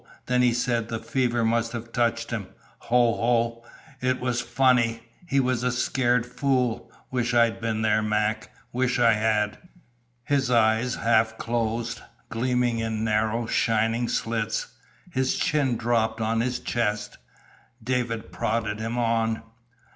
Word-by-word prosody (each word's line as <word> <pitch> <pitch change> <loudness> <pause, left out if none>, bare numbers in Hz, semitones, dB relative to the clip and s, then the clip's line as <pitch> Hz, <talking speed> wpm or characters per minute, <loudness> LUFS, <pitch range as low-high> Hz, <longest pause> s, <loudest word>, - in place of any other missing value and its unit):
Then 125 0 +2
he 125 -1 +4
said 120 -1 0
the 115 - -2
fever 120 -1 0
must 115 +1 +1
have 115 0 -6
touched 115 -1 0
him. 105 -5 -3 0.4
Ho, 120 -1 +4
ho! 115 0 +1 0.4
it 130 0 +1
was 125 -1 -1
funny. 120 -2 +2 0.3
He 140 -4 +2
was 130 -2 +1
a 125 0 +1
scared 125 -1 +1
fool. 125 -2 -1 0.2
Wish 120 -1 0
I'd 115 -1 +3
been 110 -1 -1
there, 110 0 +3
Mac; 110 0 0 0.2
wish 125 0 +1
I 115 -2 +5
had!" 105 -1 0 0.6
His 135 -1 +1
eyes 115 0 +3
half 110 -1 +2
closed, 115 0 -2 0.3
gleaming 120 0 0
in 110 -1 -2
narrow, 110 +1 +1
shining 115 +2 +1
slits. 115 -1 -1 0.4
His 130 -5 0
chin 135 -6 +1
dropped 115 -1 0
on 115 +1 +1
his 125 +1 -1
chest. 105 -3 -2 0.6
David 120 -2 -2
prodded 110 -1 -1
him 115 +2 -3
on. 115 -1 0
115 Hz, 140 wpm, -25 LUFS, 110-125 Hz, 0.6 s, I